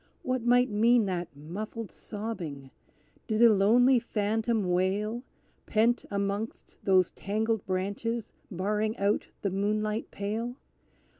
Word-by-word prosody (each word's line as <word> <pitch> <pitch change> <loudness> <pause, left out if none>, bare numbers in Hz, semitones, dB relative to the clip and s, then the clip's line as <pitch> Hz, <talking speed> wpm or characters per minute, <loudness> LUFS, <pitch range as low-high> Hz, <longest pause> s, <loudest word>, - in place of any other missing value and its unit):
What 255 -1 0
might 245 +1 +4
mean 230 +2 +4
that 180 -3 -2
muffled 210 +8 -6
sobbing? 175 -11 -6 0.6
Did 215 0 0
a 230 -2 +8
lonely 240 +6 +5
phantom 220 -1 0
wail, 200 +6 0 0.5
Pent 230 +2 +2
amongst 200 +2 -3
those 185 -2 +4
tangled 220 +1 -1
branches 200 +5 -2 0.2
barring 210 +3 -1
out 200 +1 +1 0.2
the 200 - 0
moonlight 210 +2 -1
pale? 220 +4 -3
210 Hz, 115 wpm, -29 LUFS, 195-230 Hz, 0.6 s, a